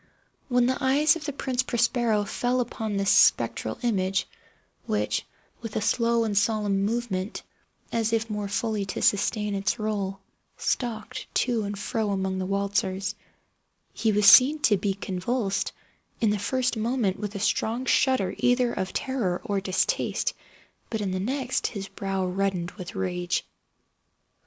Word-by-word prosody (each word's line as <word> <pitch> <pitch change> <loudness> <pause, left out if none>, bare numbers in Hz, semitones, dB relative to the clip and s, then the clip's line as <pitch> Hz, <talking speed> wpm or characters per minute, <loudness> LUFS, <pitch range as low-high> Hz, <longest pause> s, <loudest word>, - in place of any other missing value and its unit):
When 245 -1 +3
the 260 +2 0
eyes 285 +5 +4
of 335 - -7
the 295 - -2
Prince 260 -2 -1
Prospero 235 -3 +1
fell 245 +5 0
upon 220 -4 -2
this 195 0 +2
spectral - - +3
image 195 -5 +1 0.6
(which, - - -1 0.3
with 225 -2 -7
a 220 - 0
slow 230 +1 +2
and 215 -2 -1
solemn 210 -2 +1
movement, 215 -4 -2 0.5
as 225 -1 0
if 225 0 +1
more 210 -2 -3
fully 210 +1 -1
to 190 - -4
sustain 210 +1 +2
its 195 +3 0
role, 200 -3 -2 0.4
stalked 225 -4 -3
to 240 -3 +1
and 200 0 -4
fro 215 +1 -2
among 190 -1 -1
the 185 - -2
waltzers) 195 0 -1 0.8
he 225 - +1
was 210 0 +2
seen 260 +9 +9
to 210 - +4
be 195 0 -1
convulsed, 195 +2 -2 0.5
in 220 -3 +3
the 210 - 0
first 250 +5 0
moment 220 -4 0
with 205 0 -5
a - - -3
strong 225 +5 0
shudder 260 -8 +2
either 245 0 +2
of 185 0 -3
terror 235 -10 -1
or 200 -1 -1
distaste; 190 -1 0 0.6
but, 220 -2 -2
in 195 -2 -1
the 185 - -1
next, 260 +4 -1
his 200 -3 -5
brow 195 -1 -2
reddened 180 -1 -1
with 185 +3 -9
rage. 180 -2 -1
210 Hz, 150 wpm, -26 LUFS, 195-240 Hz, 0.8 s, seen